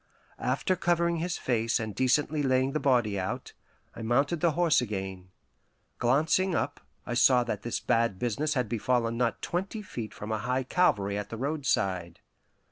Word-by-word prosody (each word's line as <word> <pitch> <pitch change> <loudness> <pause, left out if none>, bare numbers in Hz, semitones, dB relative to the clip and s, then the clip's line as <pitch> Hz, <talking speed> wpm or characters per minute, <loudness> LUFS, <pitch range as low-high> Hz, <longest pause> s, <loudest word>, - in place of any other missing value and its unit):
After 185 - 0
covering 170 -1 +1
his 175 +2 -2
face 115 -2 0
and 110 -2 -4
decently 145 +6 +1
laying 130 -1 +2
the 155 - -1
body 120 -8 +2
out, 95 +1 -4 0.4
I - - -8
mounted 140 +8 +1
the 170 -2 +2
horse 165 -4 +3
again. 95 -5 -5 0.7
Glancing 160 +9 +2
up, 145 - -1 0.3
I 120 - -3
saw 125 0 +5
that 110 -4 -3
this 120 - -2
bad 115 -4 +1
business 140 +8 -1
had 125 -3 0
befallen 115 +1 0
not 120 -1 -1
twenty 195 +5 -3
feet 115 - -6
from 105 +1 -7
a 110 - -1
high 125 +4 -1
Calvary 105 - +1
at 105 - -6
the 115 - -6
roadside. 100 - -1
125 Hz, 165 wpm, -28 LUFS, 110-150 Hz, 0.7 s, saw